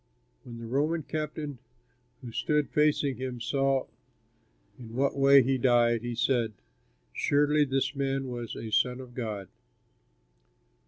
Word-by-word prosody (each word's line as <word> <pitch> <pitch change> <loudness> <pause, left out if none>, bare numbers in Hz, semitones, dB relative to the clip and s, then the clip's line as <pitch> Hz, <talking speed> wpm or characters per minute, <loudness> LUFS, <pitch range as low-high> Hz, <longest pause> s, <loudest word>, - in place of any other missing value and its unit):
When 120 -1 -9
the 115 - -8
Roman 150 +7 0
captain 150 -2 -4 0.6
who 120 - -7
stood 150 +5 0
facing 150 -3 +2
him 130 -1 -5
saw 135 +3 +1 0.9
in 115 -2 -10
what 135 +2 +1
way 140 -1 +6
he 130 +1 +1
died, 120 -2 +3
he 120 0 -4
said, 115 -2 +1 0.6
"Surely 145 +1 +2
this 135 +1 0
man 135 -1 -1
was 120 -2 -5
a 110 - -6
son 125 +3 +2
of 125 -2 -10
God." 110 -6 -4
130 Hz, 130 wpm, -28 LUFS, 120-140 Hz, 0.9 s, way